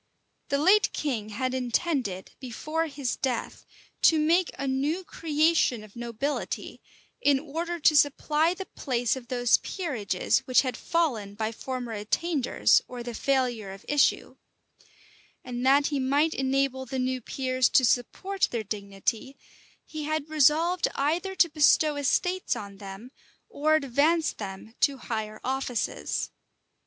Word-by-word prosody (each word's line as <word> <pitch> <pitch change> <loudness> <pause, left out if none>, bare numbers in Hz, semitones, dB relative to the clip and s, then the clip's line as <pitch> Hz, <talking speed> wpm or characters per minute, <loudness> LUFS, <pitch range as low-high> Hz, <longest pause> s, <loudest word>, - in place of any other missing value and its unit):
The 280 - +2
late 380 +8 +4
king 235 -8 -2
had 255 +4 -2
intended, 250 - -1
before 305 +6 -3
his 280 -4 -3
death, 255 -3 -3 0.3
to 320 - +6
make 330 +4 +3
a 275 +1 -3
new 285 +7 -1
creation 310 -8 +1
of 210 -2 -15
nobility, 240 +5 -4 0.4
in 285 -2 +4
order 330 +4 -4
to 305 - +5
supply 300 +3 +3
the 385 +1 -6
place 245 -8 -1
of 255 -2 -9
those 245 -1 +3
peerages 240 - -1
which 255 - +5
had 255 -2 -2
fallen 245 - -1
by 220 +1 -2
former 245 0 -5
attainders, 260 +7 +2
or 245 -1 -7
the 240 0 -6
failure 245 -5 0
of 195 +1 -10
issue; 295 -1 +1 1.1
and 245 -1 -5
that 280 +2 +5
he 280 - +1
might 285 +5 +2
enable 265 0 0
the 265 - -4
new 255 0 -1
peers 255 +1 0
to 260 - +4
support 375 +12 0
their 235 -2 -3
dignity, 210 +5 -4 0.5
he 310 -1 -6
had 310 0 -2
resolved 315 +4 +3
either 335 +7 -1
to 345 - +5
bestow 300 -1 +4
estates 360 +6 0
on 200 -1 -8
them, 195 +5 -9 0.4
or 310 +2 +2
advance 310 +3 +2
them 200 +2 -8
to 280 -1 +2
higher 220 -3 -5
offices. 260 -3 -2
270 Hz, 140 wpm, -27 LUFS, 240-310 Hz, 1.1 s, to